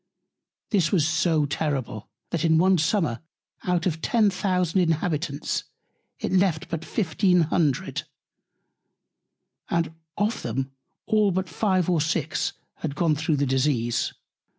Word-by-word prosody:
This 185 -8 +2
was 160 -6 +3
so 160 -1 +2
terrible, 135 -7 -3 0.2
that 170 -2 -1
in 160 -1 +4
one 185 +1 +4
Summer 160 - +1 0.5
out 180 -2 +1
of 160 -3 -1
ten 215 -1 +3
thousand 185 -2 +1
Inhabitants, 155 -3 -1 0.5
it - - -3
left 180 -4 +2
but 165 -1 -3
fifteen 180 -1 +2
hundred, 155 -4 0 1.6
and 165 -1 0 0.2
of 210 +2 0
them 130 +3 -3 0.3
all 215 -1 +3
but 190 0 -1
five 185 -1 +1
or 175 -4 +2
six 160 -1 -1 0.2
had 150 -3 -4
gone 160 -1 +2
through 155 +1 0
the 140 0 +1
Disease. 130 -3 +1
165 Hz, 130 wpm, -25 LUFS, 150-185 Hz, 1.6 s, in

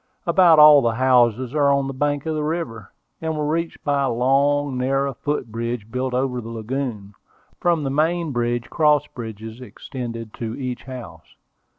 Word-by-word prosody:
About 170 -1 +5
all 150 -1 +9
the 115 -2 0
houses 125 -1 +3
are 145 -2 +3
on 140 -1 +1
the 135 - -4
bank 145 +2 -1
of 160 - -1
the 155 -1 -2
river, 150 - -4 0.3
and 160 -1 -2
were 150 - -1
reached 165 +2 -2
by 145 -1 +1
a 135 - +1
long, 140 +3 +2
narrow 135 +2 0
foot 140 -3 -3
bridge, 115 -1 -4
built 125 0 -2
over 125 -1 -1
the 115 - -9
lagoon. 115 -3 -4 0.5
From 170 -3 +1
the 135 - -2
main 160 +2 0
bridge, 120 -1 -1
cross 150 -2 +3
bridges 110 -2 -9
extended 115 -3 -7
to 115 -1 -4
each 130 -3 -5
house. 125 -11 -10
130 Hz, 175 wpm, -22 LUFS, 120-145 Hz, 0.5 s, all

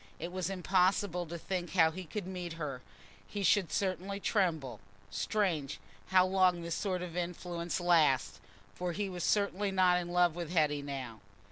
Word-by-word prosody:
It 170 +3 -5
was 185 -1 -2
impossible 185 -1 +1
to 170 +2 -5
think 180 +1 -4
how 165 -4 +5
he 185 +3 -7
could 200 +4 -5
meet 180 -2 -5
her: 145 -6 -5 0.5
he 205 - -4
should 190 -2 +3
certainly 195 +1 -1
tremble. 160 - 0 0.3
Strange, 160 - -1 0.3
how 185 -1 +5
long 185 -2 +3
this 170 0 -3
sort 185 -1 -1
of 175 -2 -7
influence 175 0 -3
lasts, 150 - +3 0.3
for 180 -1 -3
he 200 +2 -2
was 180 -2 -5
certainly 200 -1 +1
not 185 -2 +4
in 175 -1 -5
love 175 -1 +3
with 170 -3 -4
Hetty 150 -4 +2
now. 130 -6 -6
180 Hz, 165 wpm, -32 LUFS, 165-185 Hz, 0.5 s, how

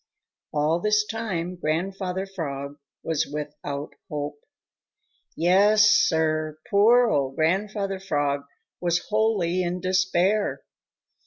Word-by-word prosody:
All 155 +3 +1
this 210 +2 +2
time 185 -6 -4
Grandfather 185 +4 -2
Frog 145 -7 -6 0.3
was 160 -3 -1
without 145 -1 -5 0.2
hope. 145 0 -4 1.0
Yes, 205 +5 +5
Sir, 155 -3 +2
poor 235 +5 +5
old 135 -2 0
Grandfather 195 +4 0
Frog 145 -6 -1 0.3
was 175 -1 -1
wholly 210 -5 +1
in 180 0 -2
despair. 190 +2 +1
175 Hz, 95 wpm, -25 LUFS, 155-200 Hz, 1.0 s, Yes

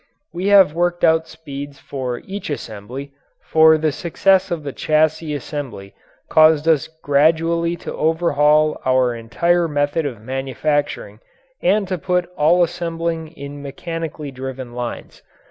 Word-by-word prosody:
We 180 +3 -2
have 195 -6 +6
worked 175 +1 0
out 160 -1 +4
speeds 145 -3 -8
for 130 -3 -5
each 200 -1 -6
assembly, 130 +1 -6 0.4
for 160 0 +6
the 155 0 0
success 185 +4 +2
of 170 -3 -3
the 140 -2 -5
chassis 155 0 +1
assembly 135 -9 -6 0.3
caused 155 0 +5
us 160 -4 +3 0.2
gradually 165 +4 +2
to - - -7
overhaul 155 -2 +2
our 130 -1 +2
entire 170 +10 +1
method 145 +1 0
of 120 -6 -7
manufacturing 135 -2 -2 0.4
and 205 -1 +2
to 185 -1 -3
put 180 +1 0
all 170 +4 +4
assembling 165 -1 -3
in 145 -2 -9
mechanically 155 0 -6
driven 130 -1 -7
lines. 120 -1 -6
155 Hz, 130 wpm, -20 LUFS, 140-170 Hz, 0.4 s, have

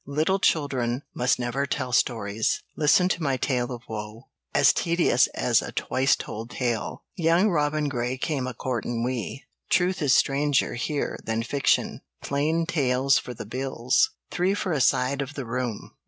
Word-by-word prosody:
"Little 155 +7 +1
Children 135 -7 0
Must 125 +1 +1
Never 125 +3 -2
Tell 130 -3 -2
Stories," 110 -3 0
"Listen 155 +4 +4
to 175 - -1
My 135 -4 0
Tale 125 -1 -1
of 120 -1 -7
Woe," 110 +2 -7 0.2
"As - - +5
Tedious 170 0 +2
as - - +2
a - - -6
Twice 135 +1 +1
Told 115 +2 -7
Tale," 120 -3 -3
"Young 170 +4 +3
Robin 150 -2 +1
Grey 125 -1 -2
Came 135 -2 -2
a 125 - -5
Courtin' 120 -1 -2
We," 125 +2 -3 0.3
"Truth 180 0 +2
is 140 -3 +4
Stranger 145 0 +2
(Here) 140 +4 -2
Than 110 0 -1
Fiction," 135 +3 +1 0.2
"Plain 155 +4 0
Tales 135 -4 +2
for 125 - -8
the - - -7
Bills," 135 - +1 0.2
three 185 +3 +1
for 200 -3 -2
a 150 -4 +1
side 130 +3 +2
of 140 +1 -6
the 135 - -4
room. 120 -2 -4
135 Hz, 165 wpm, -25 LUFS, 120-150 Hz, 0.3 s, As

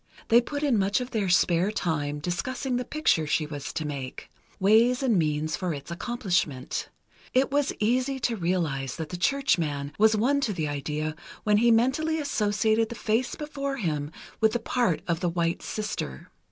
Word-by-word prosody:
They 235 +2 +7
put 285 +4 -4
in 260 -7 +3
much 195 +3 +2
of 250 0 -5
their 210 -5 0
spare 175 +1 +3
time 150 -7 -1
discussing 245 - -2
the 250 - -1
picture 245 - +1
she 155 +1 +1
was 145 -2 -6
to 155 - -3
make—ways 200 - 0
and 245 -5 +3
means 155 -2 +1
for 175 -1 -2
its 140 +3 -9
accomplishment. 180 - -2 0.5
It 265 +1 +3
was 285 0 +2
easy 255 +5 +1
to 240 -1 +1
realize 165 - -1
that 160 -2 -5
the - - -5
churchman 165 - 0
was 220 0 +5
won 280 +6 +2
to 220 -6 0
the 160 -5 -2
idea 150 +2 -3 0.3
when 210 -1 +4
he 235 +3 +4
mentally 265 +8 +2
associated 220 -5 +1
the 235 - -6
face 225 +3 0
before 280 -2 -4
him 150 - -2 0.3
with 220 -1 +3
the 240 - +1
part 230 -7 0
of 170 -2 0
the 175 - 0
White 170 0 -1
Sister. 210 - -5
205 Hz, 175 wpm, -27 LUFS, 155-245 Hz, 0.5 s, They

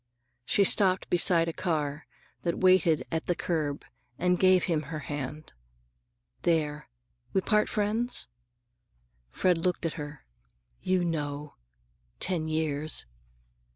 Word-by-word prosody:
She 200 - +3
stopped 190 -1 +4
beside 170 -1 +3
a 165 - -2
car 150 -4 -2 0.3
that 170 -1 -1
waited 185 -4 +4
at 160 -1 -2
the 175 - +1
curb 150 -5 -2 0.3
and 180 0 +1
gave 185 -1 +5
him 165 -4 +1
her 160 - -4
hand. 145 0 -6 0.9
"There. 150 -3 0 0.4
We 190 - +3
part 210 +2 +2
friends?" 220 +4 -1 1.0
Fred 180 - +1
looked 175 0 -1
at 165 - -1
her. 145 -1 -9 0.6
"You 185 -1 +1
know. 150 -3 -3 0.7
Ten 170 -4 -1
years." 155 - 0
165 Hz, 120 wpm, -28 LUFS, 150-185 Hz, 1.0 s, gave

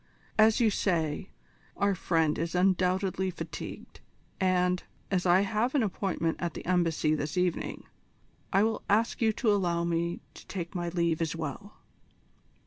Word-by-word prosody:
As 215 0 +6
you 225 -3 +4
say, 170 -3 0 0.5
our 200 0 +2
friend 165 -4 +1
is 165 +2 -2
undoubtedly 185 +1 +2
fatigued, 180 - -7 0.4
and, 180 -1 +2 0.3
as 185 -1 +1
I 175 +2 +6
have 220 +6 0
an 270 - +3
appointment 185 -5 -1
at 170 -2 -2
the - - -7
Embassy 165 -4 +2
this 150 +2 -2
evening, 180 -2 -1 0.7
I 195 +1 +4
will 225 0 0
ask 220 +4 +2
you 220 -1 +4
to 220 0 +1
allow 175 -4 +1
me 170 0 -1
to - - -14
take 175 -3 -5
my 175 -2 -2
leave 170 -2 0
as 165 -1 -1
well." 165 +6 -6
180 Hz, 150 wpm, -29 LUFS, 170-200 Hz, 0.7 s, As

